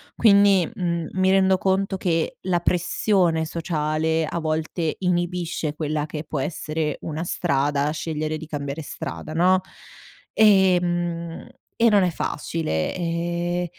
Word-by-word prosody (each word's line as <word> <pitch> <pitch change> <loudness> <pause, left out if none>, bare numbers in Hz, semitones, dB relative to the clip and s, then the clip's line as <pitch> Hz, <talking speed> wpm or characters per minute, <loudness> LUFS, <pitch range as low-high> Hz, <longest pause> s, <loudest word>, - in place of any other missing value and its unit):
Quindi, 200 -5 +5
mhmm, 170 -3 -2
mi 190 0 +2
rendo 190 -1 +4
conto 190 +1 0
che 165 -3 -1
la 180 -2 0
pressione 175 -1 +1
sociale 160 -1 -1
a 170 - -3
volte 160 0 -2
inibisce 175 -3 -1
quella 150 -1 -2
che 155 0 -6
può 150 - -4
essere 155 +1 -2
una 160 +1 -4
strada, 145 -4 0
scegliere 155 0 -3
di 160 - -8
cambiare 145 0 -4
strada, 155 +1 -6
no. 180 +3 +4 0.7
Ehm, 175 -4 +2 0.3
e 230 0 +4
non 205 -3 +4
è 180 - +1
facile. 150 - -2
Ehm, 175 0 -2
170 Hz, 125 wpm, -23 LUFS, 155-180 Hz, 0.7 s, Quindi